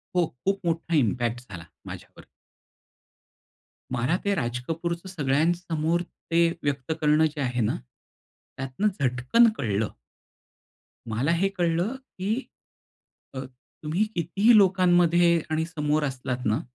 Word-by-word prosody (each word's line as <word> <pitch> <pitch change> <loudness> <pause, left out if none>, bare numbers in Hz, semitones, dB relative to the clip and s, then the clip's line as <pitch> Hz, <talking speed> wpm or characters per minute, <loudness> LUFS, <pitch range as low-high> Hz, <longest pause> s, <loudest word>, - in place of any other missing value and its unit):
हो, 175 -1 +4 0.2
खूप 195 0 +1
मोठा 165 0 0
इम्पॅक्ट 120 -2 +1
झाला 85 -2 -8 0.2
माझ्यावर. - - -10 1.7
मला 125 +9 +1
ते 200 -1 +1
राज 120 -3 -2
कपूरचं 170 +2 -3
सगळ्यांसमोर 165 +2 0 0.3
ते 170 0 +5 0.2
व्यक्त 140 0 -2
करणं 150 +1 +4
जे 150 -2 -3
आहे 125 -2 -1
ना, 110 +7 +1 0.8
त्यातनं 135 +10 -1
झटकन 130 - +4
कळलं. 105 -3 -1 1.2
मला 125 +9 0
हे 195 +3 +2
कळलं 175 +7 +1
की 215 -6 -4 1.0
अ, 130 - -5 0.4
तुम्ही 165 +8 +1
कितीही 195 +7 +4
लोकांमध्ये 175 -3 +4
आणि 160 +1 0
समोर 150 -2 0
असलात 130 -2 -3
ना 110 +2 +2
160 Hz, 115 wpm, -26 LUFS, 130-175 Hz, 1.7 s, ते